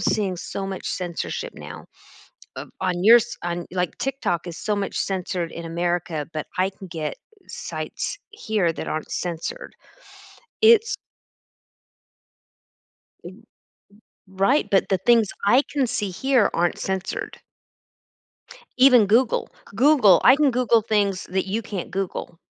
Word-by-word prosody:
seeing 195 Hz, -2 st, 0 dB
so 195 Hz, +2 st, -5 dB
much 190 Hz, -1 st, -6 dB
censorship 175 Hz, -2 st, -4 dB
now. -, -, -10 dB, 0.7 s
Of -, -, -7 dB
on 180 Hz, -1 st, -1 dB
yours 235 Hz, +2 st, +5 dB
on, 175 Hz, 0 st, -3 dB
like, 180 Hz, -1 st, -2 dB
TikTok 270 Hz, -11 st, -2 dB
is 170 Hz, -2 st, -7 dB
so 210 Hz, -, -1 dB
much 200 Hz, -1 st, -3 dB
censored 180 Hz, -3 st, -2 dB
in 170 Hz, -, -7 dB
America, 170 Hz, -2 st, -2 dB
but 155 Hz, -2 st, -4 dB
I 185 Hz, +1 st, +2 dB
can 195 Hz, 0 st, -12 dB
get 160 Hz, -3 st, -4 dB, 0.3 s
sites -, -, -5 dB
here 220 Hz, -, -1 dB
that -, -, -6 dB
aren't 155 Hz, -, -4 dB
censored. 175 Hz, -, -4 dB, 0.9 s
It's 450 Hz, 0 st, +5 dB, 2.3 s
Eh, -, -, -6 dB
eh, -, -, -11 dB, 0.9 s
right, 195 Hz, +10 st, +1 dB
but 195 Hz, -, +2 dB
the 190 Hz, -, +1 dB
things 225 Hz, +2 st, +3 dB, 0.2 s
I 245 Hz, +7 st, +5 dB
can 280 Hz, -3 st, +1 dB
see 210 Hz, -4 st, -2 dB
here 250 Hz, +3 st, +2 dB
aren't 175 Hz, 0 st, 0 dB
censored. 190 Hz, -1 st, -4 dB, 1.4 s
Even 250 Hz, -4 st, +7 dB
Google. 230 Hz, +4 st, +2 dB, 0.2 s
Google 230 Hz, -, +5 dB
I 255 Hz, -, +8 dB
can 295 Hz, -1 st, +3 dB
Google 240 Hz, -2 st, +3 dB
things 205 Hz, -3 st, 0 dB
that 190 Hz, +1 st, -2 dB
you 205 Hz, +4 st, -1 dB
can't 200 Hz, -4 st, -6 dB
Google. 185 Hz, -2 st, -4 dB
195 Hz, 135 wpm, -23 LUFS, 175-235 Hz, 2.3 s, I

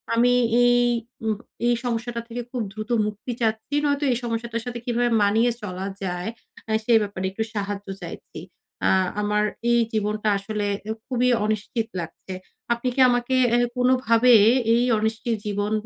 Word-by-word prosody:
আমি 245 Hz, +2 st, +4 dB, 0.3 s
এই 245 Hz, 0 st, +5 dB, 0.5 s
উম 220 Hz, -1 st, +1 dB, 0.3 s
এই 240 Hz, -, +3 dB
সমস্যাটা 235 Hz, 0 st, -2 dB
থেকে 240 Hz, +1 st, -5 dB
খুব 250 Hz, -, -2 dB
দ্রুত 215 Hz, +1 st, -7 dB, 0.2 s
মুক্তি 210 Hz, +4 st, -5 dB
চাচ্ছি। 220 Hz, +4 st, -1 dB
নয়তো 285 Hz, 0 st, +1 dB
এই 240 Hz, -, +1 dB
সমস্যাটার 230 Hz, 0 st, -3 dB
সাথে 240 Hz, -1 st, -5 dB
কিভাবে 240 Hz, -1 st, +1 dB
মানিয়ে 225 Hz, +4 st, +3 dB
চলা 190 Hz, -2 st, -5 dB, 0.2 s
যায় 180 Hz, +2 st, -3 dB, 0.4 s
আ -, -, -1 dB
সে 235 Hz, -, +3 dB
ব্যাপারে 200 Hz, -2 st, -3 dB
একটু 220 Hz, +3 st, -2 dB
সাহায্য 205 Hz, 0 st, -4 dB
চাইছি। -, -, -9 dB, 0.5 s
আ -, -, +4 dB, 0.3 s
আমার 210 Hz, 0 st, +1 dB, 0.3 s
এই 235 Hz, -, +4 dB
জীবনটা 215 Hz, 0 st, -1 dB
আসলে 210 Hz, +1 st, -3 dB, 0.2 s
অ্যা 215 Hz, +1 st, -3 dB
খুবই 250 Hz, -1 st, +1 dB, 0.2 s
অনিশ্চিত 215 Hz, +2 st, -2 dB
লাগছে। 170 Hz, +3 st, -8 dB, 0.4 s
আপনি 235 Hz, +2 st, -4 dB
কি -, -, -3 dB
আমাকে 245 Hz, +1 st, +1 dB, 0.2 s
অ্যা 240 Hz, -, +4 dB, 0.2 s
কোনোভাবে 250 Hz, -1 st, +4 dB, 0.4 s
এই 240 Hz, -, +3 dB
অনিশ্চিত 225 Hz, +2 st, -1 dB
জীবন 205 Hz, 0 st, -2 dB
225 Hz, 155 wpm, -24 LUFS, 210-245 Hz, 0.5 s, এই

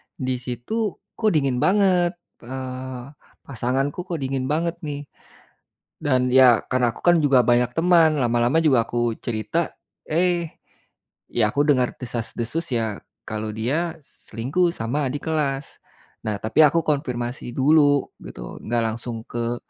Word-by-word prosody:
di 130 Hz, -1 st, -2 dB
situ 130 Hz, -, -3 dB, 0.2 s
kok 220 Hz, -2 st, +3 dB
dingin 135 Hz, -4 st, +1 dB
banget, 185 Hz, -1 st, +3 dB, 0.3 s
eee, 130 Hz, +1 st, -6 dB, 0.3 s
pasanganku 135 Hz, +6 st, -2 dB
kok 175 Hz, -, -3 dB
dingin 130 Hz, -1 st, -2 dB
banget 165 Hz, +2 st, 0 dB
nih, 145 Hz, -1 st, -4 dB, 1.0 s
dan 130 Hz, -3 st, +1 dB
ya 130 Hz, -3 st, +6 dB
karena 125 Hz, -2 st, +1 dB
aku -, -, -12 dB
kan 175 Hz, -1 st, +5 dB
juga 135 Hz, -4 st, +5 dB
banyak 120 Hz, +1 st, +3 dB
teman 165 Hz, -2 st, +4 dB
lama-lama 120 Hz, +4 st, +2 dB
juga 130 Hz, -7 st, +4 dB
aku 120 Hz, -1 st, 0 dB
cerita, 120 Hz, -, -2 dB, 0.3 s
eh, 170 Hz, 0 st, +1 dB, 0.8 s
ya 105 Hz, -3 st, +1 dB
aku 145 Hz, -, +3 dB
dengar 130 Hz, -4 st, +2 dB
desas-desus 120 Hz, +6 st, -3 dB
ya 110 Hz, -3 st, -2 dB, 0.3 s
kalau 110 Hz, 0 st, -3 dB
dia 155 Hz, +9 st, -1 dB
selingkuh 140 Hz, +11 st, -2 dB
sama 135 Hz, +6 st, -1 dB
adik 145 Hz, +3 st, -6 dB
kelas, 140 Hz, -3 st, -2 dB, 0.4 s
nah 105 Hz, -1 st, -1 dB
tapi 110 Hz, +8 st, -2 dB
aku 165 Hz, +3 st, +1 dB
konfirmasi 125 Hz, -5 st, -2 dB
dulu 145 Hz, 0 st, +4 dB, 0.2 s
gitu -, -, -9 dB
gak 120 Hz, 0 st, +1 dB
langsung 115 Hz, 0 st, -4 dB
ke, 120 Hz, 0 st, -2 dB
130 Hz, 135 wpm, -23 LUFS, 120-155 Hz, 1.0 s, ya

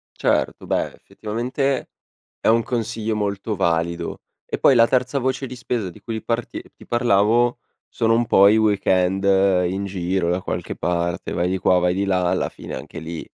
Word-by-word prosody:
Certo, -, -, 0 dB
beh -, -, -1 dB
effettivamente 125 Hz, +5 st, -3 dB, 0.5 s
è -, -, -6 dB
un 115 Hz, +1 st, +4 dB
consiglio 115 Hz, -2 st, -2 dB
molto 100 Hz, +1 st, -2 dB
valido. 85 Hz, 0 st, -1 dB, 0.3 s
E -, -, -3 dB
poi 135 Hz, -, +5 dB
la 115 Hz, -1 st, +6 dB
terza 130 Hz, +2 st, 0 dB
voce 130 Hz, +1 st, -1 dB
di 130 Hz, -, -8 dB
spesa 120 Hz, -6 st, -3 dB
di -, -, -15 dB
cui 110 Hz, -2 st, -5 dB
parti 115 Hz, 0 st, -3 dB
ti -, -, -16 dB
parlavo 120 Hz, 0 st, +2 dB, 0.3 s
sono 115 Hz, 0 st, +1 dB
un 120 Hz, +1 st, +1 dB
po' 100 Hz, -3 st, +6 dB
i 105 Hz, -, +4 dB
weekend 95 Hz, -3 st, +2 dB, 0.4 s
in 95 Hz, +2 st, -3 dB
giro 90 Hz, -2 st, -1 dB
da 90 Hz, +1 st, 0 dB
qualche -, -, -4 dB
parte. 85 Hz, 0 st, -2 dB
Vai 90 Hz, +1 st, 0 dB
di 95 Hz, -, 0 dB
qua, 90 Hz, -1 st, +3 dB
vai 90 Hz, 0 st, +1 dB
di 100 Hz, +2 st, 0 dB
là, 90 Hz, -2 st, +1 dB
alla -, -, 0 dB
fine -, -, -9 dB
anche -, -, -8 dB
lì, 80 Hz, +1 st, -6 dB
105 Hz, 180 wpm, -22 LUFS, 90-120 Hz, 0.5 s, la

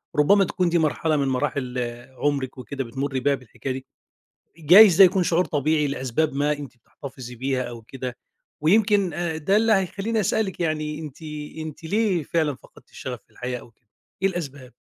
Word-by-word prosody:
ربما 195 Hz, +7 st, +5 dB
تكون 180 Hz, 0 st, 0 dB
دي 170 Hz, -, +2 dB
مرحلة 155 Hz, 0 st, +1 dB
من 140 Hz, -1 st, +1 dB
مراحل 130 Hz, -1 st, -1 dB, 0.4 s
عمرِك، 140 Hz, -3 st, -1 dB
وكده 135 Hz, +3 st, -5 dB
بتمري 135 Hz, +2 st, -3 dB
بيها 140 Hz, +2 st, +2 dB
بالحكاية 130 Hz, +1 st, -6 dB
دي، 130 Hz, 0 st, -7 dB, 0.7 s
جايز 180 Hz, +4 st, +8 dB
ده 195 Hz, -, +11 dB
يكون 185 Hz, +1 st, +4 dB
شعور 175 Hz, +1 st, +2 dB
طبيعي 150 Hz, -1 st, +1 dB
لأسباب 140 Hz, +2 st, -1 dB
ما 145 Hz, +1 st, +1 dB
أنتِ 145 Hz, -4 st, -7 dB
بتحتفظي 125 Hz, 0 st, -10 dB
بيها 130 Hz, +1 st, -1 dB
أو 120 Hz, -2 st, -7 dB
كده، 125 Hz, +1 st, -6 dB, 0.4 s
ويمكن 200 Hz, +1 st, +3 dB
آآ 170 Hz, -2 st, -2 dB
ده 190 Hz, +6 st, +1 dB
اللي 225 Hz, +1 st, +3 dB
هيخليني 205 Hz, +3 st, 0 dB
أسألِك 190 Hz, -1 st, -1 dB
يعني، 155 Hz, -2 st, -1 dB
أنتِ 150 Hz, -1 st, -9 dB, 0.4 s
أنتِ 160 Hz, +1 st, -7 dB
ليه 200 Hz, -1 st, +1 dB
فعلًا 150 Hz, -1 st, 0 dB
فقدتِ -, -, -20 dB
الشغف -, -, -7 dB
في -, -, -39 dB
الحياة 125 Hz, 0 st, -4 dB
أو -, -, -16 dB
كده، 115 Hz, +1 st, -41 dB, 0.4 s
إيه 195 Hz, -, +4 dB
الأسباب؟ 140 Hz, -8 st, -6 dB
150 Hz, 175 wpm, -24 LUFS, 130-175 Hz, 0.7 s, ده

